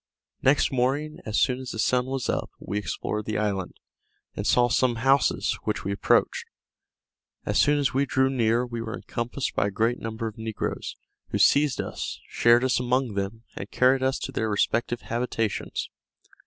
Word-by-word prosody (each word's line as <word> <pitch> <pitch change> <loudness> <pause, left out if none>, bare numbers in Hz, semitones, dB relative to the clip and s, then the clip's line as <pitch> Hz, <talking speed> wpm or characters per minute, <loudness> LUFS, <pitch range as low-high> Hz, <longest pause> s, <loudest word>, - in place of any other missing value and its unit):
Next 140 +2 +3
morning, 135 +4 0
as 105 - -1
soon 125 0 +2
as 130 -1 -7
the - - -5
sun 125 +3 +1
was 135 -1 -2
up, - - -1
we 100 +2 -3
explored 105 +3 -3
the 110 - -2
island, 100 -4 -2 0.6
and 100 - -3
saw 120 -1 +4
some 120 0 +2
houses, 135 +4 +2
which - - -2
we 100 - -2
approached. 100 - +1 1.0
As - - +1
soon 145 +1 +4
as 140 -2 +1
we 140 +2 +1
drew 130 0 +2
near, 120 -2 +1
we 120 -1 -5
were 115 0 -4
encompassed 120 +3 -4
by - - +1
a - - -1
great 115 +5 0
number 115 0 -4
of 110 0 -6
negroes, 110 -1 -4 0.3
who - - -1
seized 145 -3 +4
us, - - -4
shared 120 +1 +4
us 130 -1 +2
among 125 -1 0
them, 100 +3 -4
and 100 - -6
carried 130 +1 +3
us 130 +1 +1
to - - -5
their 110 -3 -1
respective 115 +3 0
habitations. 115 -2 -2
120 Hz, 180 wpm, -26 LUFS, 110-130 Hz, 1.0 s, saw